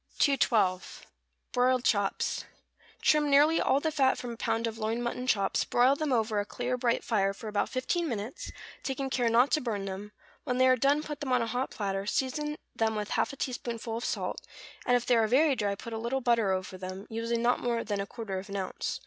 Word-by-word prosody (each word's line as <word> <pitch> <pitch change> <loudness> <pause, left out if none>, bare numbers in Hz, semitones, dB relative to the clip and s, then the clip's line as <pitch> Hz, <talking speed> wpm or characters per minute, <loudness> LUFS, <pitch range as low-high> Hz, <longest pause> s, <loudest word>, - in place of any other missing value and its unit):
212. 220 - +2 0.5
=Broiled 250 0 +2
Chops.= 200 -5 0 0.6
Trim 300 -1 +4
nearly 295 +3 +5
all 270 - +3
the 315 +2 -1
fat 270 -3 +3
from 245 - -5
a - - -6
pound 230 0 -1
of 225 0 -4
loin 220 +2 -1
mutton 245 +1 -3
chops, 200 -5 +2
broil 250 +3 +3
them 300 -1 -2
over 220 -3 +1
a - - +1
clear, 245 +4 -3
bright 240 -1 0
fire 195 -3 +1
for 220 - -8
about 210 -1 0
fifteen 325 +6 -1
minutes, 220 +2 -5 0.3
taking 270 0 -3
care 245 -2 +2
not 240 +4 +4
to 310 - +3
burn 215 -6 -2
them; 195 +2 -6 0.3
when 250 - -1
they 260 0 +5
are 255 - +6
done 280 +4 +2
put 295 -2 -6
them 275 -3 -3
on 250 -2 +3
a - - -1
hot 245 +4 -2
platter, 195 -1 -3
season 295 +6 -1 0.2
them 220 -1 +1
with 210 -1 -3
half - - +1
a - - -8
teaspoonful 235 -3 -4
of 235 - -5
salt, - - -2 0.5
and 245 - +5
if 245 - -4
they 245 - +4
are 225 -1 +3
very 275 +5 +4
dry 205 -4 -1
put 230 +3 -8
a 225 - -3
little 235 +4 -1
butter 235 -5 +2
over 185 0 -3
them, 185 +2 -6
using 230 +1 -1
not 245 +1 +3
more 235 -1 -1
than 205 -2 -2
a 200 - -5
quarter 200 -5 -5
of 195 +2 -10
an 200 - -5
ounce. 190 -2 -3
235 Hz, 225 wpm, -29 LUFS, 210-260 Hz, 0.6 s, are